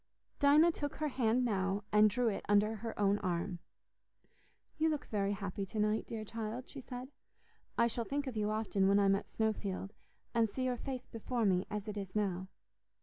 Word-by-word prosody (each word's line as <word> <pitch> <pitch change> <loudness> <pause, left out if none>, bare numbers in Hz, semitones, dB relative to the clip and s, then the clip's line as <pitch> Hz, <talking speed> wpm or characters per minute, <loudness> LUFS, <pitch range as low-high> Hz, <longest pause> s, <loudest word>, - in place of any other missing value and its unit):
Dinah 300 +4 +6
took 290 -3 -4
her 305 -1 -1
hand 250 -1 +2
now 195 -2 0
and 210 0 +6
drew 245 +3 +1
it 205 - -1
under 210 +2 +4
her 225 +1 -6
own 205 0 +3
arm. 175 0 -2 1.2
"You 320 +1 +4
look 300 -2 -2
very 200 -1 0
happy 200 -1 -4
to 215 - -4
night, 210 +1 +1
dear 220 -2 -5
child," 225 +3 -5
she 275 - -8
said. 250 0 -7 0.7
"I 235 - +5
shall 235 0 -1
think 285 +3 -2
of 260 -3 -4
you 210 -1 0
often 215 -3 +1
when 200 +1 +5
I'm 200 -1 +5
at 195 - -2
Snowfield, 205 -3 -2 0.4
and 230 -2 +3
see 255 +6 -3
your 250 -1 0
face 255 0 -5
before 230 +1 -2
me 185 -1 +2
as 210 0 -4
it 210 -1 -4
is 195 -1 -5
now. 190 -3 0
215 Hz, 195 wpm, -34 LUFS, 200-245 Hz, 1.2 s, Dinah